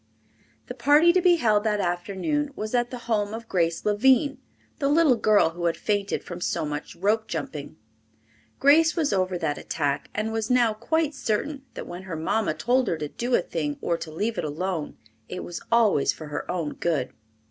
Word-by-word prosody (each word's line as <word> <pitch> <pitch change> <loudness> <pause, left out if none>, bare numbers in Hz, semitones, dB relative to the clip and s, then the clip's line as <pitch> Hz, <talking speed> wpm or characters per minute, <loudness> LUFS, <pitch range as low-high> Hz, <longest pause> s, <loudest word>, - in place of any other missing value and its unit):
The - - -6
party 300 +5 +5
to 370 - +3
be 355 -1 +5
held 215 -9 +2
that 210 -2 +1
afternoon 195 - -1
was 215 +2 -5
at 240 -1 +1
the 250 - -6
home 215 -2 0
of 230 0 -8
Grace 170 -4 0
Lavine, 260 +6 +3 0.4
the 280 - +1
little 300 -3 +5
girl 215 -6 +3
who 175 +1 -5
had 170 - +1
fainted 205 -1 -1
from 175 0 -8
so 160 - -1
much 150 0 -5
rope 210 +5 0
jumping. 150 -2 -5 0.8
Grace 315 +3 +5
was 310 - +1
over 185 -1 0
that 160 -4 -2
attack, 145 -2 -2
and 215 +1 -1
was 225 -1 -2
now 245 -3 +3
quite 305 +8 0
certain 275 +3 -2
that - - -6
when 175 +1 -7
her 165 - -3
mamma 160 +2 0
told 245 +9 +1
her 165 - 0
to 150 -1 -4
do 240 +7 -1
a - - +2
thing 150 -4 -3
or 170 - 0
to 165 - -7
leave 210 +8 -2
it - - -2
alone, 160 +2 -3 0.3
it 180 - -5
was 175 - -6
always 220 -11 +4
for 155 -2 -9
her 150 - -5
own 170 -4 -2
good. 160 -7 -1
210 Hz, 195 wpm, -25 LUFS, 170-250 Hz, 0.8 s, party